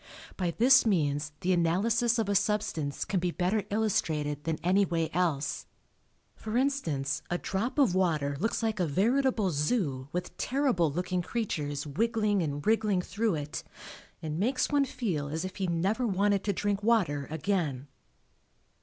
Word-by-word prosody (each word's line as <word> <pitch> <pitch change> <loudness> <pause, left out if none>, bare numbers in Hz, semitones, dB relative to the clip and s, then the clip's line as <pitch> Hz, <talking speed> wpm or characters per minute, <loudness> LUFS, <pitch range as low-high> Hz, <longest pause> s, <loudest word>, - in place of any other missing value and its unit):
By 180 -2 -1
this 260 +3 +6
means 150 -7 0
the 185 0 +2
analysis 215 +8 +2
of 225 -3 0
a 200 - +1
substance 200 -8 0
can 190 - 0
be 180 0 0
better 185 +4 0
illustrated 155 -9 -1
than 160 -1 -1
any 190 +3 +4
way 165 -3 -1
else. 160 -5 -1 0.7
For 220 +2 -3
instance 165 - 0
a 175 - 0
drop 225 +10 -3
of 265 -11 +4
water 155 -7 +1
looks 225 +4 -1
like 220 -2 -1
a 175 - +1
veritable 220 - +2
Zoo 150 - -1
with 180 +2 -4
terrible 255 - +1
looking 180 +3 -1
creatures 150 -9 -3
wiggling 210 +5 +1
and 145 -3 -3
wriggling 210 -4 +2
through 210 0 -1
it, 150 -1 -5 0.6
and 155 0 -3
makes 255 +8 +1
one 285 -1 +3
feel 195 - -2
as 160 +5 -3
if 185 - -7
he 190 -2 -1
never 195 +9 0
wanted 200 0 +1
to 200 - +1
drink 205 +1 -1
water 190 - +1
again. 155 -5 -1
185 Hz, 155 wpm, -29 LUFS, 155-220 Hz, 0.7 s, this